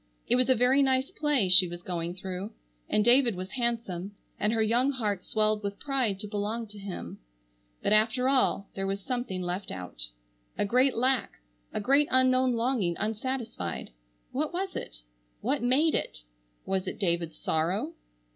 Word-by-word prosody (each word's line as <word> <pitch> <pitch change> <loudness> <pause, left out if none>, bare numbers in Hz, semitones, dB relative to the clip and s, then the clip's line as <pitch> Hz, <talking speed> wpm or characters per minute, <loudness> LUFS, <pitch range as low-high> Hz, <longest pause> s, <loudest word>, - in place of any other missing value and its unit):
It 245 - +4
was 255 0 +2
a 260 - +6
very 250 +4 +4
nice 265 +2 +2
play 295 - +1
she 185 0 +7
was 175 0 -8
going 175 -1 -3
through, 190 +2 -5 0.4
and 210 - +2
David 240 -2 +5
was 185 +1 -6
handsome, 225 -6 -2 0.2
and 210 - +1
her 225 -1 +2
young 240 +5 +3
heart 210 -8 -1
swelled 215 -1 +1
with 200 -1 -4
pride 255 -9 0
to 210 - -5
belong 210 +3 -2
to 210 0 -10
him, 195 -2 -7 0.6
but - - +3
after 225 +4 +3
all 260 -7 +2
there 195 0 -3
was 195 +1 -2
something 240 -6 -3
left 180 +3 -3
out. 90 -10 -4 0.5
A - - +1
great 255 +5 +3
lack, 255 -2 +1 0.4
a - - -2
great 275 +7 +3
unknown 255 0 +4
longing 230 -7 0
unsatisfied. 220 - -3 0.4
What 300 +3 -1
was 380 +2 -3
it? - - -7 0.4
What 270 +6 0
made 270 +6 +3
it? - - -3 0.4
Was 190 -1 -1
it - - -4
David's 170 -4 0
sorrow? 165 +2 -1
215 Hz, 165 wpm, -28 LUFS, 190-255 Hz, 0.6 s, she